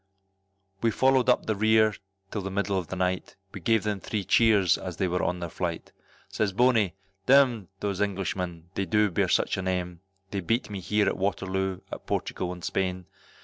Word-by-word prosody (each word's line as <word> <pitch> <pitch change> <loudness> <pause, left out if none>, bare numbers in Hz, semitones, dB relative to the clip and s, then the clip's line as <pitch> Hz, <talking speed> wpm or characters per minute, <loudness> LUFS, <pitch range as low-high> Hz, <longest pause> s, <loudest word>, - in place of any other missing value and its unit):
We 115 - +3
followed 130 +2 +3
up 125 - +3
the 110 - +1
rear 110 +1 +4 0.4
till 105 - -3
the 95 - -4
middle 100 +1 -1
of 90 -3 -2
the 95 - -5
night, 90 0 -2 0.2
We - - -6
gave 115 -2 +2
them 105 -2 -1
three 105 +1 -3
cheers 105 -5 +4
as 90 -2 -6
they 95 - +1
were 90 0 0
on 90 - 0
their 85 - -2
flight, 85 0 -4 0.4
Says 105 -3 -1
Bony, 110 -5 +3 0.3
d 130 - +6
m 125 -8 +4
those 100 -1 -2
Englishmen, 90 -3 -3
they 100 - -1
do 105 -2 +2
bear - - +1
such - - +2
a - - -1
name, 90 -2 -2 0.3
They 100 - -2
beat 110 +4 -1
me 100 - -4
here 105 +3 +1
at - - 0
Waterloo, 95 -1 -1
at - - -8
Portugal 90 -1 -2
and 90 -1 -8
Spain. 90 +2 -2
95 Hz, 195 wpm, -27 LUFS, 90-110 Hz, 0.4 s, d